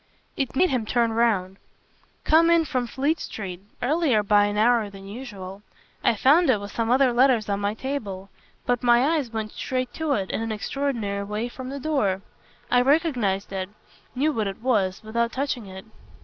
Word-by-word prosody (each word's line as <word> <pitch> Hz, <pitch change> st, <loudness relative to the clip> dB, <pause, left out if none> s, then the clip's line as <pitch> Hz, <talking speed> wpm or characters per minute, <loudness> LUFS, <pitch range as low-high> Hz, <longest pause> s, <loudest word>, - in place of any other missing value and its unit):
It 270 Hz, -2 st, -2 dB
made 365 Hz, +6 st, +3 dB
him 250 Hz, -4 st, 0 dB
turn 230 Hz, -1 st, +1 dB
round. 200 Hz, -5 st, +1 dB, 0.7 s
"Coming 335 Hz, +1 st, +5 dB
in -, -, -3 dB
from 255 Hz, -5 st, -1 dB
Fleet 285 Hz, +7 st, 0 dB
Street 185 Hz, -4 st, -6 dB, 0.2 s
earlier 275 Hz, -5 st, +2 dB
by 205 Hz, 0 st, +4 dB
an 205 Hz, 0 st, -2 dB
hour 225 Hz, -1 st, +3 dB
than 195 Hz, -1 st, -12 dB
usual 200 Hz, -4 st, -8 dB, 0.4 s
I -, -, +3 dB
found 295 Hz, -, +4 dB
it 230 Hz, -5 st, +4 dB
with 200 Hz, 0 st, -7 dB
some 230 Hz, -1 st, -2 dB
other 255 Hz, 0 st, +4 dB
letters 245 Hz, -3 st, +3 dB
on 200 Hz, 0 st, 0 dB
my 205 Hz, +1 st, -1 dB
table. 205 Hz, -8 st, -5 dB, 0.3 s
But 245 Hz, -1 st, +1 dB
my 240 Hz, +1 st, +4 dB
eyes 285 Hz, -6 st, -1 dB
went 220 Hz, -1 st, -4 dB
straight 255 Hz, -1 st, -3 dB
to 315 Hz, -2 st, -1 dB
it, 195 Hz, -5 st, -2 dB
in -, -, -2 dB
an 225 Hz, 0 st, -3 dB
extraordinary 215 Hz, -3 st, -2 dB
way, 210 Hz, +4 st, -3 dB
from 255 Hz, +1 st, -8 dB
the 280 Hz, +1 st, -5 dB
door. 215 Hz, -11 st, 0 dB, 0.5 s
I 245 Hz, -, +5 dB
recognised 250 Hz, -, +1 dB
it, 190 Hz, 0 st, -3 dB, 0.5 s
knew 290 Hz, +5 st, +2 dB
what 220 Hz, -4 st, -1 dB
it 195 Hz, -, -5 dB
was, 205 Hz, -6 st, +1 dB
without 235 Hz, +2 st, -1 dB
touching 255 Hz, -5 st, -2 dB
it." 190 Hz, +1 st, -10 dB
235 Hz, 185 wpm, -24 LUFS, 205-265 Hz, 0.7 s, Coming